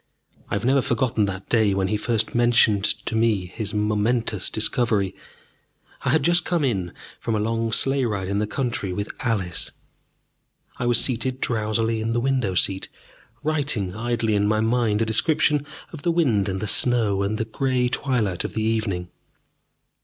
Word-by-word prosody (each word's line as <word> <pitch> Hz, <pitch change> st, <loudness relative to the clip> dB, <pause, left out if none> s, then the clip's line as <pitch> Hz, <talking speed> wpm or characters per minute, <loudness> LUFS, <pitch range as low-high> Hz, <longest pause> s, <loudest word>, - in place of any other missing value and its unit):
I -, -, -1 dB
have 100 Hz, -, -2 dB
never 135 Hz, +2 st, +4 dB
forgotten 115 Hz, -3 st, +1 dB
that 95 Hz, 0 st, -5 dB
day 110 Hz, -4 st, +2 dB
when 95 Hz, -1 st, 0 dB
he 105 Hz, -, 0 dB
first 110 Hz, 0 st, 0 dB
mentioned 120 Hz, -4 st, +3 dB
to -, -, -1 dB
me 110 Hz, -4 st, +2 dB
his 100 Hz, +3 st, -5 dB
momentous 105 Hz, 0 st, 0 dB
discovery. 110 Hz, -4 st, +1 dB, 0.9 s
I -, -, -1 dB
had 150 Hz, +2 st, +3 dB
just 175 Hz, +3 st, +3 dB
come 170 Hz, -4 st, 0 dB
in 95 Hz, -10 st, -1 dB, 0.3 s
from 115 Hz, -, -2 dB
a -, -, 0 dB
long 115 Hz, +1 st, -1 dB
sleigh 135 Hz, +3 st, +1 dB
ride 100 Hz, -5 st, -2 dB
in 100 Hz, +1 st, -1 dB
the 105 Hz, -, -1 dB
country 115 Hz, -5 st, -2 dB
with 100 Hz, +3 st, -4 dB
Alice, 95 Hz, -8 st, 0 dB
and -, -, -12 dB, 1.0 s
I 125 Hz, -, -3 dB
was 120 Hz, -, +4 dB
seated 130 Hz, +1 st, -1 dB
drowsily 110 Hz, -1 st, 0 dB
in 115 Hz, +1 st, -1 dB
the 120 Hz, -, +1 dB
window 125 Hz, -7 st, 0 dB
seat, 95 Hz, +1 st, +2 dB, 0.5 s
writing 140 Hz, -11 st, -1 dB
idly 115 Hz, -1 st, -1 dB
in 105 Hz, 0 st, +2 dB
my 110 Hz, +1 st, +2 dB
mind 115 Hz, -1 st, +1 dB
a -, -, -1 dB
description 145 Hz, +5 st, +2 dB, 0.3 s
of 155 Hz, -, -7 dB
the 170 Hz, -, +1 dB
wind 120 Hz, -, +2 dB
and 95 Hz, 0 st, -3 dB
the -, -, -2 dB
snow 110 Hz, -3 st, +2 dB
and 100 Hz, +2 st, -1 dB
the 110 Hz, -, -1 dB
grey 125 Hz, +2 st, 0 dB
twilight 120 Hz, -8 st, -1 dB
of -, -, -5 dB
the 110 Hz, -, -1 dB
evening. 105 Hz, -6 st, -1 dB
110 Hz, 175 wpm, -23 LUFS, 105-125 Hz, 1.0 s, never